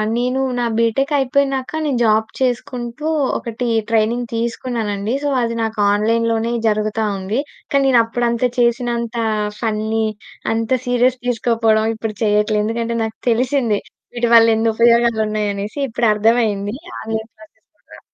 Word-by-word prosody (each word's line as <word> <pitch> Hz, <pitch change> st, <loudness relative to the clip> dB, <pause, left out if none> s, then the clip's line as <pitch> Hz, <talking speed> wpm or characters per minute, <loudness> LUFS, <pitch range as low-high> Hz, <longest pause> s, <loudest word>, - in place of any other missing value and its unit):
నేను 250 Hz, +2 st, 0 dB, 0.2 s
నా 240 Hz, -, 0 dB
బీటెక్ 230 Hz, +5 st, +1 dB
అయిపోయినాక 270 Hz, 0 st, 0 dB
నేను 265 Hz, -5 st, 0 dB
జాబ్ 220 Hz, 0 st, +3 dB
చేసుకుంటూ, 245 Hz, +2 st, -2 dB, 0.3 s
ఒకటి 235 Hz, +1 st, -4 dB, 0.2 s
ట్రైనింగ్ 230 Hz, +2 st, +1 dB
తీసుకున్నానండి. 230 Hz, -2 st, -2 dB
సో 290 Hz, -, +1 dB
అది 230 Hz, 0 st, -1 dB
నాకు 220 Hz, -1 st, -3 dB
ఆన్లైన్‌లోనే 230 Hz, +2 st, +1 dB, 0.2 s
జరుగుతా 215 Hz, +1 st, 0 dB
ఉంది. 195 Hz, +6 st, -2 dB, 0.3 s
కానీ 275 Hz, -1 st, +3 dB
నేను 245 Hz, -3 st, +5 dB
అప్పుడంత 235 Hz, +1 st, -1 dB, 0.2 s
చేసినంత 235 Hz, 0 st, 0 dB, 0.4 s
ఫన్ని 220 Hz, 0 st, -1 dB, 0.5 s
అంత 225 Hz, 0 st, -2 dB, 0.2 s
సీరియస్‌గా 245 Hz, 0 st, +1 dB
తీసుకోకపోవడం, 225 Hz, -2 st, +2 dB
ఇప్పుడు 220 Hz, -1 st, -5 dB
చేయట్లేదు. 210 Hz, 0 st, +2 dB
ఎందుకంటే 230 Hz, +1 st, -2 dB
నాకు 220 Hz, 0 st, -5 dB
తెలిసింది. 235 Hz, -2 st, +1 dB, 0.4 s
వీటి 240 Hz, -1 st, 0 dB
వల్ల 230 Hz, 0 st, +7 dB
ఎన్ని 225 Hz, +1 st, +1 dB
ఉపయోగాలు 235 Hz, -1 st, +4 dB
ఉన్నాయి 210 Hz, -1 st, -1 dB
అనేసి. 205 Hz, +8 st, -5 dB
ఇప్పుడు 235 Hz, 0 st, 0 dB
అర్థమయింది. 210 Hz, -1 st, +1 dB, 0.3 s
ఆన్లైన్ 220 Hz, 0 st, -4 dB
క్లాసెస్ 215 Hz, 0 st, -20 dB
కూడా -, -, -16 dB
230 Hz, 130 wpm, -19 LUFS, 220-240 Hz, 0.5 s, వల్ల